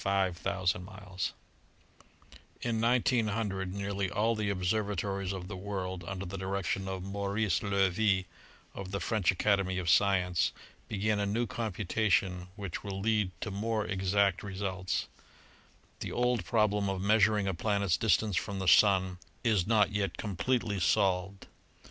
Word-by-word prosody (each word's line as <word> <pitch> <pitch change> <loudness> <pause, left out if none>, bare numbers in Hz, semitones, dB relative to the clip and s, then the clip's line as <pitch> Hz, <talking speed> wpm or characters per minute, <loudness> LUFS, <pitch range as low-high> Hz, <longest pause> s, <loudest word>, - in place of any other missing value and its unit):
In 95 -2 +1 2.5
1900 115 -6 +1
nearly 100 0 -2
all 110 +6 +1
the 105 -2 -1
observatories 100 0 -1
of 95 -2 -5
the 100 - -6
world 95 -2 -4
under 95 +1 -4
the 95 +1 -6
direc 95 0 -2
tion 95 +2 -1
of 95 -1 -4
Maurice 100 0 0
Loewy 100 -1 +2 0.5
and 100 - -6
the 100 +1 -3
French 100 0 0
Academy 95 -1 +2
of 90 - -2
Sci 100 +3 +5
ence 90 -2 0 0.3
began 105 0 0
a 100 - 0
new 115 +4 0
computation 100 -4 0
which 100 -5 -5
will 100 -2 -4
lead 105 -1 +1
to 105 - -3
more 110 +2 -1
exact 95 0 +1
results. 95 -3 -3 0.9
The - - -4
old 120 -5 +1
problem 105 +1 +2
of 95 -1 -2
measuring 105 0 +3
a 95 - 0
planet's 100 -1 +1
distance 105 -1 +2
from 100 +2 -2
the 95 -1 -3
Sun 95 0 +5 0.2
its 105 -7 +2
not 110 -2 +4
yet 100 -1 -1
completely 105 +1 -1
solved. 95 +1 +1
100 Hz, 135 wpm, -31 LUFS, 95-105 Hz, 2.5 s, Sci